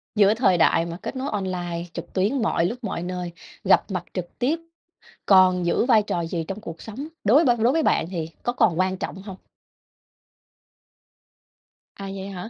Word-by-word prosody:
Giữa 205 0 +5
thời 215 -6 +3
đại 165 0 +3
mà 170 0 -6
kết - - -5
nối 265 +2 -3
online 180 -4 -3
trực - - -8
tuyến 210 +8 +1
mọi 170 -6 +1
lúc 240 +7 -4
mọi 175 - -3
nơi, 180 -1 -4 0.3
gặp 195 +2 +3
mặt 180 -3 -2
trực 180 -2 -6
tiếp 290 +7 +1 0.7
còn 185 -2 +5
giữ 170 - +2
vai 230 -4 +5
trò 175 -4 -2
gì 165 0 -3
trong 195 +2 -5
cuộc 165 -6 -9
sống, 255 +8 -7 0.2
đối 260 +11 +5
b - - +3
đối 235 +4 +4
với 325 - +2
bạn 160 - +2
thì 165 -3 -4
có 240 - -1
còn 220 -9 +2
quan 185 0 +1
trọng 190 0 -6
hông? 195 -2 -8 2.6
À, 195 - -8
vậy 195 0 -6
hả? 190 +2 -7
195 Hz, 185 wpm, -24 LUFS, 175-225 Hz, 2.6 s, Giữa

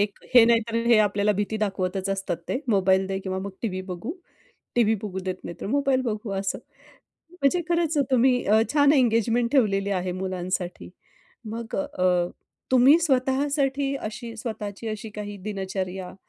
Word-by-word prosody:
एक 205 -1 -1 0.2
हे 240 - +9
नाहीतर 230 0 +2
हे 235 -1 +6
आपल्याला 205 0 +2
भीती 205 +2 -2
दाखवतच 195 -2 -2
असतात 195 -3 -2
ते. 260 - -1
मोबाईल 190 -2 +3
दे 190 0 -2
किंवा 190 -1 -3
मग 200 +1 -5
टीव्ही 185 -5 -2
बघू, 220 - -5 0.6
टीव्ही 225 -2 +3
बघू 190 -3 -4
देत 185 -1 -2
नाही, 170 - -7
तर - - -4
मोबाईल 270 +2 +1
बघू 215 -3 -3
असं. 195 0 -2 0.7
म्हणजे 355 0 +1
खरंच 335 -2 +1
तुम्ही 250 0 +3
अ, 215 +2 +4
छान 285 -1 +5
एंगेजमेंट 235 -2 +2
ठेवलेली 200 -7 +2
आहे 180 0 -3
मुलांसाठी. 185 -1 -3 0.6
मग 225 +1 -5
अ, 185 -11 +1 0.4
तुम्ही 260 +5 +7
स्वतःसाठी 275 -1 +1
अशी 230 +1 -6
स्वतःची 220 -1 -5
अशी 215 0 -5
काही 205 -1 -6
दिनचर्या 190 -2 -4
215 Hz, 150 wpm, -25 LUFS, 195-255 Hz, 0.7 s, हे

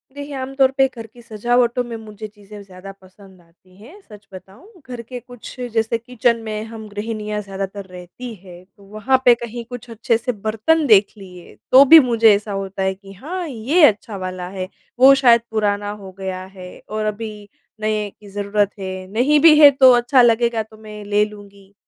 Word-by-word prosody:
देखिए, 285 0 -8
आमतौर 265 0 0
पे 270 0 +4
घर 225 -1 -8
की 240 +2 -18
सजावटों 240 +2 0
में 235 -1 -7
मुझे 215 -1 -10
चीज़ें 205 0 -14
ज़्यादा 190 0 -12
पसंद 190 0 -19
आती 175 +2 -27
हैं। 280 - -15
सच 205 -1 -15
बताऊँ 210 - -15
घर 245 -2 -7
के 245 +2 -9
कुछ 245 +1 -13
जैसे 225 +1 0
किचन 235 0 -1
में 215 0 -4
हम 220 -1 -9
गृहिणियाँ 210 0 -5
ज़्यादातर 195 0 -7
रहती 185 +7 -10
है 180 -2 -14
तो 200 - -19
वहाँ 220 +6 -1
पे 245 -1 +7
कहीं 235 0 -7
कुछ 245 -1 -9
अच्छे 230 +1 -1
से 245 +2 -3
बर्तन 220 +9 0
देख 205 -2 +4
लिए 180 -3 -14 0.2
तो 265 +2 +9
भी 320 +4 +9
मुझे 225 -2 +5
ऐसा 205 +1 -5
होता 195 -1 -4
है 190 0 0
कि 195 0 -15
हाँ 340 - -6
ये 280 +6 0
अच्छा 210 -3 0
वाला 185 -1 -6
है। 185 -1 -6 0.3
वो 270 +1 +8
शायद 240 -3 +4
पुराना 205 -1 -1
हो 190 - -10
गया 185 -1 -5
है 180 -1 -10 0.2
और 215 0 -3
अभी 210 -1 -6 0.3
नए 215 -1 -1
की 205 - -15
ज़रूरत 205 0 -1
है। 185 -1 -6
नहीं 275 +7 +2
भी 315 0 +7
है 290 - +10
तो 260 -1 +6
अच्छा 245 +2 +3
लगेगा 235 -1 +2
तो 215 0 -19
मैं 215 -1 -11
ले 205 +1 +2
लूँगी। 200 -1 -15
215 Hz, 190 wpm, -19 LUFS, 200-245 Hz, 0.3 s, है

